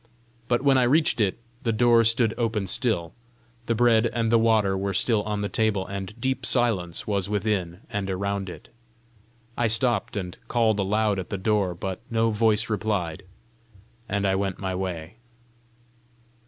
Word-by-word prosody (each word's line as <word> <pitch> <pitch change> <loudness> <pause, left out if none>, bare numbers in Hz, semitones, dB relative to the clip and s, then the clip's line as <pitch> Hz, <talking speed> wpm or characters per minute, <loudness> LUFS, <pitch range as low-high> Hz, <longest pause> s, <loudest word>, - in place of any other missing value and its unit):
But 120 +1 +1
when 135 -2 +4
I - - +3
reached 150 -4 +3
it, 100 -3 +1 0.2
the 115 - 0
door 115 +1 +4
stood 115 0 +2
open 115 -4 -1
still; 95 - -1 0.5
the 115 - +1
bread 115 0 +4
and 115 -1 -1
the 115 - +5
water 110 -4 +3
were 100 0 -2
still 110 -4 +2
on 105 0 -3
the 100 - -1
table; 105 -3 0
and 100 +3 -7
deep 130 +2 -1
silence 100 -9 +2
was 100 -2 -1
within 100 -4 -1
and 100 -4 -3
around 100 0 -2
it. - - -11 0.9
I 120 - +1
stopped 115 -1 +1
and 90 -2 -5
called 110 -3 +2
aloud 105 +1 +1
at 90 - -6
the 100 - -3
door, 95 -2 0
but 95 +3 -5
no 115 0 +1
voice 110 0 +2
replied, 105 -7 -2 0.9
and 100 0 0
I 95 - +2
went 95 -1 -1
my 95 -2 -3
way. 90 +1 -5
105 Hz, 165 wpm, -25 LUFS, 95-115 Hz, 0.9 s, the